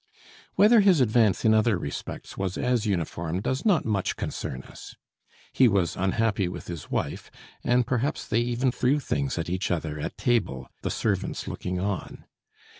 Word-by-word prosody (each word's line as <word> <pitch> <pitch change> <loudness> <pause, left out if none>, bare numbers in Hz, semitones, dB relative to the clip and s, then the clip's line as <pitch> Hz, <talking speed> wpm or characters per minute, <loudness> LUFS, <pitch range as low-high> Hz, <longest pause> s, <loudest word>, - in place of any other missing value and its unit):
Whether 220 +3 +6
his 195 -6 +5
advance 110 -4 +3
in 110 - +6
other 110 -2 +3
respects 70 -4 -6
was 95 -1 -3
as 120 -3 +1
uniform 85 -2 -2
does 130 +7 -2
not 195 -8 +3
much 100 -4 0
concern 65 0 -4
us. - - -12 0.6
He 130 - +5
was 100 -6 +1
unhappy 100 +1 +1
with 90 - -7
his 85 -4 -7
wife, - - -3 0.3
and 125 0 +3
perhaps 130 +5 -1
they 110 - +1
even 120 +2 0
threw 130 +4 +1
things 140 -3 -2
at 85 - -2
each 90 +3 -2
other 80 -3 -2
at - - -5
table, 100 - 0
the - - -2
servants - - -2
looking 90 0 -3
on. 100 0 -4
110 Hz, 165 wpm, -26 LUFS, 90-125 Hz, 0.6 s, Whether